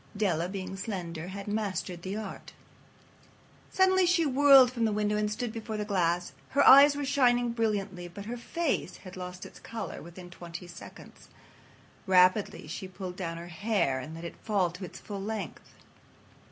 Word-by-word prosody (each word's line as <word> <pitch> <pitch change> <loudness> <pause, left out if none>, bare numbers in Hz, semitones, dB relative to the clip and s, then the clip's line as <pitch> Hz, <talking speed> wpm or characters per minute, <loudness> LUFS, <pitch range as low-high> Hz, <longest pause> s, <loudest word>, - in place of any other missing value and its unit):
Della, 175 -5 0
being 190 -1 -5
slender, 180 -5 -5
had 200 +2 -7
mastered 200 -4 -3
the 190 +3 -4
art. 215 0 -7 1.2
Suddenly 375 -1 +4
she 345 -2 +3
whirled 275 -2 +7
from 235 -2 -2
the 220 - +1
window 210 0 0
and 210 0 0
stood 225 +1 -3
before 220 -1 -5
the 210 - -2
glass. 175 -5 0 0.2
Her 280 +1 +3
eyes 280 +2 +9
were 285 0 -2
shining 245 -3 +3
brilliantly, 205 -6 -2
but 200 +4 -9
her 235 +3 -4
face 305 +6 -2
had 185 - -9
lost 180 0 -7
its - - -12
color 225 -1 -6
within 175 +1 -11
twenty 175 0 -9
seconds. 175 - -13 0.8
Rapidly 185 +2 +3
she 170 +5 -6
pulled 185 -1 -7
down 165 -3 -4
her 170 +1 -8
hair 170 -7 0
and 150 +5 -8
let 165 +1 -8
it 170 - -8
fall 195 -5 0
to 180 +2 -9
its - - -10
full 200 -2 -7
length. 205 -5 -6
200 Hz, 170 wpm, -29 LUFS, 180-230 Hz, 1.2 s, eyes